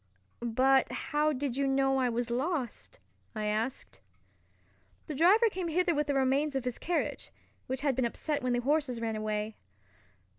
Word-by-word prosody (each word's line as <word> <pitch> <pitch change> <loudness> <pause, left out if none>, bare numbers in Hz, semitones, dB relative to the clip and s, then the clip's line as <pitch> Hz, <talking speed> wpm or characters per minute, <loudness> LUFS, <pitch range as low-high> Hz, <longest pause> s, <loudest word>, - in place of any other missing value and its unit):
"But 255 +3 +3
how 295 +4 0
did 270 -2 -2
you 275 0 +1
know 270 0 +2
I 255 -1 +2
was 240 0 -2
lost?" 275 - -3 0.4
I 215 -1 -2
asked. 215 - -2 1.1
"The - - -5
driver 380 - +5
came 370 -4 -3
hither 345 +2 +2
with 295 -1 0
the 285 - 0
remains 270 +2 +1
of 265 - -1
his 250 -1 -3
carriage, 345 0 -2 0.4
which 260 +1 -3
had 280 -3 +1
been 255 -1 +1
upset 290 +5 -2
when 250 -1 0
the 245 - +1
horses 280 -2 0
ran 225 -1 -2
away." 215 0 -3
270 Hz, 170 wpm, -30 LUFS, 240-300 Hz, 1.1 s, driver